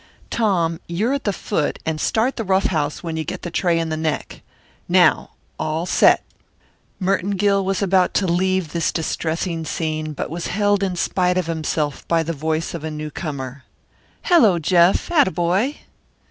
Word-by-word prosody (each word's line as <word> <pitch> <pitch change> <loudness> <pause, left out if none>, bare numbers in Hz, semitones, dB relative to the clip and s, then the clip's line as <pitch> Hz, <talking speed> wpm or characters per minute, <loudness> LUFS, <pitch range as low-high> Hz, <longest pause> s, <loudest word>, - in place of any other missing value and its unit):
Tom, 175 -7 +1
you're 210 +10 0
at 280 - -3
the 205 - +2
foot 155 -4 -2
and 155 -1 -2
start 235 +4 +1
the 225 - -3
rough 190 0 +2
house 150 -3 -1
when 165 -2 -4
you 160 - -1
get - - -6
the 175 - -5
tray 175 -1 +1
in 165 -1 -1
the 160 - -1
neck. 155 -1 -3 0.5
Now, - - +3 0.3
all 155 +2 -1
set." - - +4 0.8
Merton 195 +1 0
Gill 200 0 +2
was 195 +1 -1
about 190 -1 +2
to 200 - +2
leave 185 -1 0
this 170 -2 0
distressing 165 +1 -2
scene 155 -1 -3
but 145 - -5
was 170 +1 -4
held 205 0 +1
in 190 -2 -1
spite 180 +1 +1
of 185 - 0
himself 155 -3 -2
by 165 -1 +2
the 165 +1 -3
voice 160 +2 -2
of 165 -3 -6
a 160 - -3
newcomer. 145 -3 -6 0.6
"Hello, 235 - +5
Jeff! 175 - +3
Atta 295 - +4
boy!" 185 - 0
170 Hz, 175 wpm, -21 LUFS, 160-195 Hz, 0.8 s, Hello